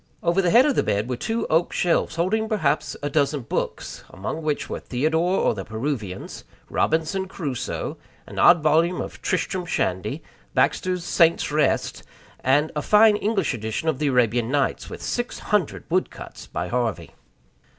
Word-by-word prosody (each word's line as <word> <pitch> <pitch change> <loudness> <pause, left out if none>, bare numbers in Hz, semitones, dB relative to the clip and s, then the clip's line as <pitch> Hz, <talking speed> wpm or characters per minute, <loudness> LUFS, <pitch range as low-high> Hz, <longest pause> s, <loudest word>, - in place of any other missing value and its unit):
Over 175 +3 +2
the 180 - +2
head 240 +7 +6
of 295 - +2
the - - +2
bed 105 +2 -1
were 125 - -2
two 225 - -2
oak 165 +2 +1
shelves, 175 -2 +1
holding 215 +6 0
perhaps 205 -9 0
a 145 - -1
dozen 145 -1 +1
books 115 - -4
among 100 - -5
which 150 -2 -2
were - - -4
Theodore, 160 +8 0
or - - +2
The 100 -3 -5
Peruvians; 110 -4 -5 0.3
Robinson 165 +5 0
Crusoe; 145 -9 -4 0.3
an - - -7
odd 175 -3 +6
volume 165 +4 +3
of - - -6
Tristram 185 +1 -1
Shandy; 90 - -2 0.3
Baxter's 180 -1 +1
Saints' 165 -3 +2
Rest, 150 -2 +1 0.4
and 145 +4 +2
a 150 - -1
fine 210 +5 +5
English 205 -4 0
edition 120 +8 -2
of 145 -4 -1
the 150 - +1
Arabian 120 -3 +2
Nights, 140 0 0
with - - -8
six 240 0 -2
hundred 210 -8 -1
wood 185 +2 +1
cuts - - -11
by 85 - -4
Harvey. 120 -3 -2
160 Hz, 165 wpm, -23 LUFS, 130-185 Hz, 0.4 s, head